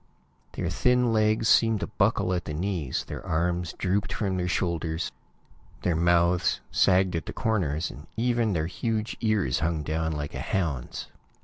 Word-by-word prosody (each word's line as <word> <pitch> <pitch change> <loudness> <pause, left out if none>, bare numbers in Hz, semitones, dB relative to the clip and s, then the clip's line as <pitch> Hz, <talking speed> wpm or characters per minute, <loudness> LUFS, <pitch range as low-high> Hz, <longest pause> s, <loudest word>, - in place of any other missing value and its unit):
Their 85 - -2
thin 125 +5 +3
legs 110 0 +2
seemed 115 -2 +4
to - - 0
buckle 90 - +1
at 90 -1 -2
the 75 - -4
knees, 85 -5 -2
their - - -7
arms 85 +1 -1
drooped 95 -1 -1
from 100 -3 -1
their 90 -1 -1
shoulders, 85 -2 -1 0.7
their 90 - +1
mouths 85 +1 +3
sagged 95 -1 +3
at 80 - -3
the - - -4
corners, 85 - -1 0.2
even 120 -2 +1
their 80 -3 0
huge 110 +5 -2
ears 105 - +1
hung 80 -1 -1
down 80 +1 -1
like 75 -1 -4
a - - -4
hound's. 80 -10 -2
90 Hz, 155 wpm, -27 LUFS, 80-110 Hz, 0.7 s, seemed